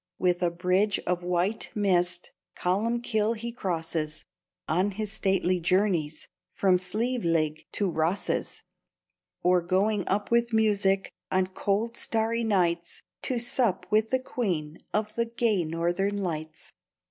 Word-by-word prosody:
With 180 -1 +1
a 175 - +3
bridge 180 +4 +1
of 180 0 0
white 180 +4 0
mist 180 -4 +1 0.3
Columbkill 220 +3 +1
he 235 +2 -4
crosses, 165 -7 -3 0.4
On 185 +5 +2
his 205 +1 -4
stately 190 -3 +1
journeys 170 -4 +1 0.2
From 185 -2 +2
Slieveleague 180 -7 0
to 200 - +1
Rosses; 170 +3 -1 0.8
Or 180 0 +4
going 195 +3 +1
up 205 +3 0
with 235 0 +2
music 200 -3 +2 0.2
On 185 0 +3
cold 200 +4 -1
starry 225 +1 0
nights, 175 -5 0 0.2
To 255 - -1
sup 235 -6 0
with 215 +1 +3
the 260 - +3
Queen 175 -12 -3
Of 215 0 -1
the 235 +1 0
gay 230 -5 +1
Northern 175 +5 0
Lights. 160 -5 -5
195 Hz, 125 wpm, -28 LUFS, 175-220 Hz, 0.8 s, Or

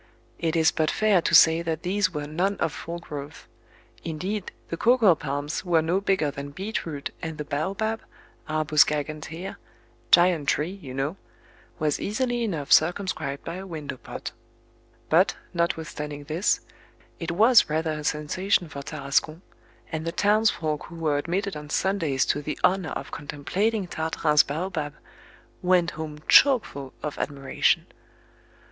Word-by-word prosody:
It 165 0 0
is 160 -1 +4
but 155 -1 +1
fair 215 -4 +3
to - - +2
say 165 0 +7
that 165 -1 -3
these 185 0 +1
were 150 -3 -4
none 180 +7 0
of 160 - -1
full 170 +1 -6
growth; 145 -4 -8 0.6
indeed, 180 +5 -3 0.2
the - - -2
cocoa 225 -1 +5
palms 145 +1 -3
were 170 -3 +2
no 175 +4 +1
bigger 190 -7 +1
than 140 0 -7
beet 190 +7 -4
root 145 -3 -5
and 160 -2 -5
the 150 - -4
baobab 195 +10 -2 0.5
(arbos 155 -1 +4
gigantea 155 +4 -4 0.5
"giant 175 -4 +5
tree," 155 +4 +1
you 130 -4 -8
know) 140 +7 -2 0.6
was 155 -3 0
easily 240 +3 -1
enough 160 -10 -3
circumscribed 155 -4 +2
by 165 +2 -5
a 190 +1 -7
window 155 -6 -6
pot; - - -7 0.8
but, - - +4 0.2
notwithstanding 155 -4 -2
this, 160 +7 +1 0.6
it 165 - -4
was 225 +6 +5
rather 160 +1 0
a 150 -1 -4
sensation 165 +4 0
for 140 -2 -7
Tarascon, 155 +4 -1 0.5
and 160 -1 -3
the 165 - -2
townsfolk 200 -6 +1
who 170 - -11
were 155 -3 0
admitted 190 +5 -2
on 150 0 -8
Sundays 160 -7 +1
to 145 - 0
the 150 +1 -4
honour 180 -3 +3
of - - -6
contemplating 190 +9 -1
Tartarin's 160 -2 +2
baobab, 155 -1 -3 0.7
went 180 -1 +3
home 155 -1 -6
chokeful 215 - +5
of 150 - -4
admiration. 140 -2 +1
160 Hz, 145 wpm, -26 LUFS, 150-185 Hz, 0.8 s, say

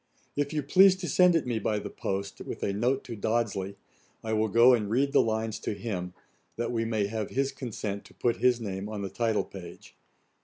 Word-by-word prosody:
If 145 0 -1
you 150 -2 -1
please 190 +6 +6
to 185 -1 -5
send 180 -1 +5
it 165 - +1
me 120 -3 -1
by 105 0 0
the 105 - -5
post, 100 0 -4
with - - -6
a 100 - 0
note 125 +6 0
to 120 - -7
Dodsley, 105 -3 -1 0.5
I 110 0 -2
will 110 0 +2
go 115 +4 +6
and 105 -4 +1
read 135 +5 +2
the - - +6
lines 110 -1 -1
to 105 - -3
him, 95 -4 -4 0.4
that 120 +1 -2
we 115 -1 0
may 110 -3 0
have 110 0 -3
his 135 +1 0
consent 110 -6 -5
to - - -17
put 120 -1 0
his 125 -1 +3
name 100 -2 -4
in 105 -2 -4
the 95 - -3
title 115 +1 +1
page. 90 -3 -11
115 Hz, 220 wpm, -28 LUFS, 100-125 Hz, 0.5 s, please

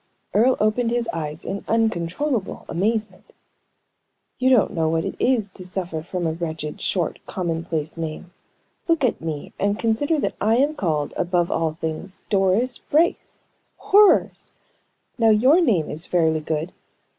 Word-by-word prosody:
Earle 245 +5 +4
opened 215 +3 +1
his 240 -1 0
eyes 155 0 -5
in 200 - -4
uncontrollable 225 - -1
amazement. 215 +5 -2 1.1
"You 260 0 +3
don't 250 -5 +4
know 160 -2 +1
what 165 0 0
it - - -3
is 240 -5 +2
to 185 - -9
suffer 180 -3 -3
from 175 +1 -4
a 160 - +1
wretched, 160 -2 -5
short, 175 -4 -1
commonplace 165 -3 -3
name. 165 +2 -6 0.5
Look 330 -4 +2
at 250 - +1
me, 155 -3 -5
and 205 +1 +1
consider 285 +8 +1
that - - -1
I 220 +2 +3
am 280 +5 +2
called, 155 - -1
above 175 -1 0
all 160 -1 0
things, 160 +4 -5
Doris 205 +5 +2
Brace! 325 +4 0 0.4
Horrors! 410 0 +3 0.7
Now, 225 -1 +5
your 255 +11 +5
name 205 - +2
is 160 +3 -6
fairly 160 -3 +2
good. 155 +2 -3
185 Hz, 145 wpm, -22 LUFS, 165-230 Hz, 1.1 s, Now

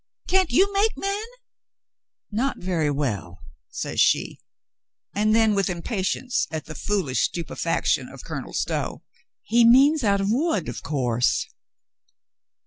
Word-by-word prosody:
"Can't 375 -2 +3
you 390 +10 +3
make 410 +3 +1
men 395 +2 -2 0.6
?" - - -67 0.3
"Not 250 +6 -1
very 175 -5 -1
well," 110 - -3 0.3
says - - -4
she, - - +2 0.7
and 215 +1 +2
then, 225 -1 +4
with 195 -2 +1
impa 180 +4 -3
tience 245 +6 -1
at 160 -2 -5
the 155 - -8
foolish 155 -4 -1
stupefaction 170 -1 -1
of - - -11
Colonel - - -6
Stow: - - -2 0.4
"He 235 +1 +3
means 270 +5 +6
out 200 -2 +2
of 195 +1 0
wood, 250 - 0
of 120 - -5
course." 125 -5 0
205 Hz, 135 wpm, -24 LUFS, 155-260 Hz, 0.7 s, means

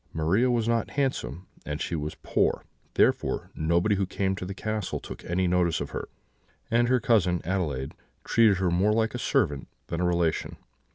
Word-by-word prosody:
Maria 90 +11 +2
was 115 -2 +1
not 115 0 +1
handsome, 130 - -2 0.2
and 75 0 -4
she 85 - -2
was 75 -1 -4
poor; - - +1 0.3
therefore, - - +1
nobody 85 +6 +2
who 100 -2 0
came 95 0 -1
to 90 - -6
the 100 - -4
castle 110 -1 -3
took - - -9
any 90 +2 0
notice 90 -2 +2
of - - -5
her: - - -5 0.6
and 120 +1 +3
her 125 0 +3
cousin 105 -8 +2
Adelaide 75 -8 -2 0.3
treated 110 -4 +4
her 90 -1 +1
more 95 +5 +3
like 110 0 +1
a - - -4
servant 70 -2 0 0.2
than 85 - -2
a - - +1
relation. 85 -2 0
95 Hz, 180 wpm, -27 LUFS, 85-110 Hz, 0.6 s, treated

